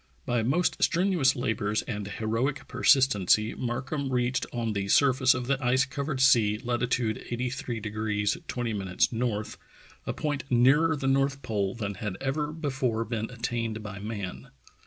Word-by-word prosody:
B}'^ 120 -2 +1
most 155 +10 +1
strenuous 175 -7 +3
labors 110 -3 -1
and 105 -3 -5
heroic 115 +7 -2
persistency 130 -6 +3
Markham 130 +3 -3
reached 125 0 0
on 115 -2 -2
the 100 -1 -2
sur 135 +6 +5
face 130 0 +4
of 125 -1 -3
the 135 +1 -1
ice 130 +2 +3
covered 140 0 -4
sea 115 -5 +4
latitude 120 -1 -1
83 120 -1 -3 0.5
20' 115 +3 -2
N., 105 +4 0 0.6
a - - -1
point 145 -3 -2
nearer 135 +7 +4
the 135 -2 -5
north 135 +1 +1
pole 100 -3 -1
than 100 -3 -3
had 95 -1 -5
ever 150 +3 -1
before 135 -7 -1
been 115 -1 -3
at 120 -2 -13
tained 115 -2 -2
by 100 -2 -7
man. 100 -3 -6
120 Hz, 150 wpm, -28 LUFS, 110-135 Hz, 0.6 s, sur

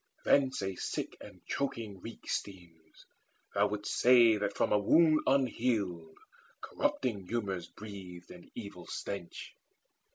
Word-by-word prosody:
Thence 135 -6 +3
a 95 -1 -2
sick - - -3
and 90 - -13
choking 115 -8 -3
reek 115 - -10
Steams: 85 -5 -6 0.5
thou 100 +1 +3
wouldst 105 0 -3
say 120 -3 +7
that 105 - -2
from - - +1
a 105 - +4
wound 155 +9 +5
unhealed 110 -11 0 0.4
Corrupting 105 -8 -2
humours 95 -7 -2
breathed 95 -4 -10
an 85 -1 -13
evil 100 -6 -8
stench. 100 -4 -6
100 Hz, 125 wpm, -32 LUFS, 90-120 Hz, 0.5 s, say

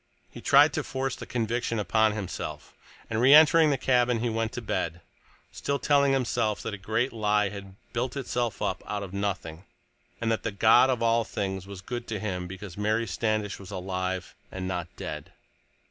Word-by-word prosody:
He - - -10
tried - - +6
to - - -1
force 135 0 -3
the - - -9
conviction 115 0 -1
upon 110 +2 +2
himself, 100 -4 -6 0.3
and 110 0 -1
reentering 155 +4 +7
the 140 - +2
cabin 125 -2 +2
he 120 +1 0
went 115 0 -1
to - - -3
bed, 85 -5 -2 0.5
still 140 - -2
telling 140 -1 +3
himself 120 -5 0
that 110 - -4
a - - -4
great 110 +6 -1
lie 105 -2 +2
had 100 -1 -9 0.2
built 125 +3 -2
itself 120 -5 -2
up - - -1
out 105 -1 -3
of 95 -1 -8
nothing, 95 -4 -3 0.6
and 115 -1 0
that 110 - 0
the - - -2
God 110 +5 +5
of 125 -3 0
all 115 0 +3
things 95 -3 -4
was 100 -2 -8
good 120 +4 -5
to 110 -2 -3
him 90 -3 -3
because 95 0 -9
Mary 110 +2 +1
Standish 105 +1 -1
was 95 -2 -11
alive, 95 -1 -3 0.2
and 95 -1 -4
not 90 -2 -3
dead. - - -7
110 Hz, 185 wpm, -27 LUFS, 95-120 Hz, 0.6 s, reentering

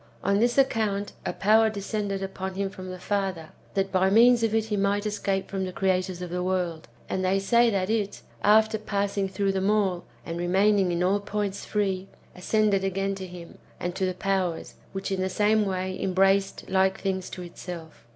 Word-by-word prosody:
On 200 +1 +2
this 240 +3 +2
account, 215 -6 +1 0.2
a - - 0
power 220 +2 +4
descended 200 -1 -3
upon 190 0 -5
him 195 0 -2
from 185 -1 -8
the 185 - -6
Father, 190 -4 -2 0.3
that 195 0 0
by 190 0 +3
means 235 +3 +6
of 225 -1 +1
it 220 -1 +2
he 215 -1 -2
might 200 +1 +1
escape 200 -2 -1
from 195 -1 -3
the 185 - -3
creators 185 -1 -1
of 175 - -6
the 180 0 -2
world; 180 -3 -2 0.2
and 190 - -2
they 185 +1 +2
say 235 +4 +4
that 195 -4 0
it, 210 -2 -2 0.2
after 220 +1 +4
passing 200 -2 -1
through 195 +1 0
them 195 +1 0
all, 195 -4 +1 0.2
and 165 0 -4
re 175 - -1
maining 195 +1 +3
in 175 0 0
all 195 +3 +2
points 205 -1 -3
free, 195 -2 -1 0.3
ascended 200 +1 +1
again 195 +1 -1
to 190 -1 -6
him, 175 -1 -11 0.2
and 175 0 -3
to 190 0 -1
the 185 - -2
powers,^ 185 -2 -1 0.2
which 195 0 -4
in 190 -1 -1
the 190 - 0
same 210 +2 +2
way 185 0 -3
embraced 195 +1 +2
like 190 0 +2
things 190 -2 -2
to 180 - -7
itself. 170 -5 -9
195 Hz, 200 wpm, -26 LUFS, 185-205 Hz, 0.3 s, means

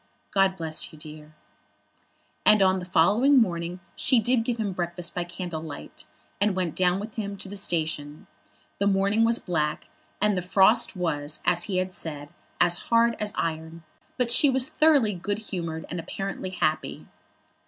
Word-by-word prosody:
God 195 -1 +3
bless 160 -2 -4
you, 155 - -14
dear." 155 0 -11 1.1
And 215 -2 +6
on 190 0 +3
the 180 - -7
following 210 - +4
morning 175 -5 +1 0.2
she 255 - +3
did 235 +1 +2
give 240 0 -2
him 220 - -1
his 190 - -6
breakfast 175 -1 -3
by 175 - -2
candle 175 -2 -6
light, 155 -3 -9 0.4
and 205 -2 +2
went 180 -4 -2
down 180 0 +2
with 215 +3 -8
him 200 -2 -4
to 195 - -4
the 200 - -7
station. 155 -5 -2 0.5
The 200 - +2
morning 200 +3 +2
was 230 0 +3
black, 155 -7 -2 0.3
and 210 0 +2
the 180 - -1
frost 190 +5 +3
was, 155 -4 -2
as 175 0 +2
he 190 -3 -2
had 185 0 -1
said, 145 -4 -6 0.3
as 175 0 +3
hard 230 0 +4
as 210 -1 -2
iron, 160 0 -3 0.3
but 245 -2 +1
she 285 +4 +5
was 265 +1 +1
thoroughly 300 -9 +3
good 200 +3 -3
humoured, 170 -7 -5
and 175 - -5
apparently 195 +3 -5
happy. 155 -4 -2
185 Hz, 175 wpm, -26 LUFS, 165-210 Hz, 1.1 s, And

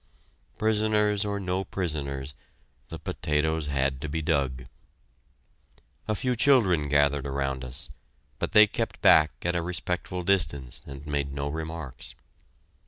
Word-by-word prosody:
Prisoners 105 -1 +2
or 100 -1 -2
no 95 0 -1
prisoners, 75 -7 -3 0.6
the 80 - -6
potatoes 75 0 -1
had 70 -2 0
to 75 - -4
be 80 +3 -2
dug. 70 -5 0 1.4
A 110 - +1
few 125 +4 0
children 100 - +4
gathered 70 -1 +2
around 70 -1 -2
us, 60 0 -5 0.5
but - - -2
they 105 0 +8
kept 105 - -3
back 75 0 +7
at 85 0 0
a 85 - +1
respectful 90 +1 -3
distance 80 -9 0
and 70 +1 -9
made 70 -2 -2
no 70 +1 -3
remarks. 80 -4 -5
80 Hz, 130 wpm, -27 LUFS, 70-95 Hz, 1.4 s, they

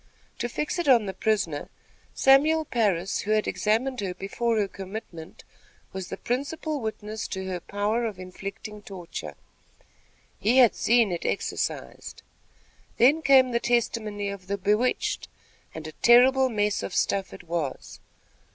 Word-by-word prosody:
To 240 - -2
fix 300 +8 -3
it 345 - -2
on 240 -5 +5
the 190 - -4
prisoner, 190 -7 -1 0.5
Samuel 305 +4 +4
Parris, 200 - 0
who 210 - -3
had 215 -1 +1
examined 235 +5 0
her 185 -2 -3
before 225 +5 -1
her 205 -2 +1
commitment, 190 -4 -9 0.5
was 190 -1 -6
the - - -5
principal 285 +4 -3
witness 215 -1 -5
to 190 -1 -5
her 185 -1 -3
power 205 +6 -1
of 210 -4 -6
inflicting 195 +3 -8
torture. 185 -4 -8 1.0
He 240 +5 +2
had 245 -4 +7
seen 230 -3 +3
it 175 - -3
exercised. - - -3 0.7
Then 280 +7 +5
came 265 -4 +5
the 235 - +1
testimony 220 -4 -1
of 195 -2 -8
the 200 +1 -2
bewitched, 210 +6 0 0.5
and 160 -1 -7
a 155 - -6
terrible 260 +6 +5
mess 210 -2 0
of - - -5
stuff 195 -1 0
it - - -11
was. 165 -5 -4
215 Hz, 145 wpm, -26 LUFS, 190-245 Hz, 1.0 s, had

